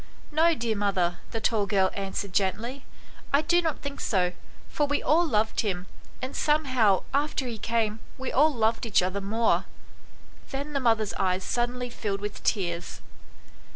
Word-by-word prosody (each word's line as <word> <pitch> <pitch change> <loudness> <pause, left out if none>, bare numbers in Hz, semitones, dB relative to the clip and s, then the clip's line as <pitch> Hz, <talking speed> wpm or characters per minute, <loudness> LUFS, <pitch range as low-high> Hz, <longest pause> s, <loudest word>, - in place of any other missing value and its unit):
" - - -24
No, 325 +2 +4
dear 230 -4 -1
mother," 185 -4 0
the 225 - -3
tall 215 -2 +1
girl 190 -1 +3
answered 195 -1 -4
gently, 220 +8 -1 0.2
" - - -22
I 285 +2 +4
do 345 +3 +3
not 320 -3 -2
think 280 0 -5
so, 180 -3 +1 0.3
for 295 - 0
we 290 +1 0
all 335 +3 +4
loved 220 -4 +1
him, 185 -4 -2 0.4
and 260 - -4
some 300 +1 +2
how 225 -8 +3
after 285 -1 0
he 235 -3 -5
came 225 -1 0 0.2
we 265 -1 -4
all 305 +4 +5
loved 225 -2 0
each 205 -4 +3
other 185 +2 -2
more." 225 +4 +1 0.8
Then 280 +2 -4
the 280 - +1
mother's 225 -4 +2
eyes 185 -1 +1
suddenly 245 +2 -1
filled 200 -4 -3
with 205 0 -5
tears. 175 -4 -1
225 Hz, 175 wpm, -27 LUFS, 200-275 Hz, 0.8 s, all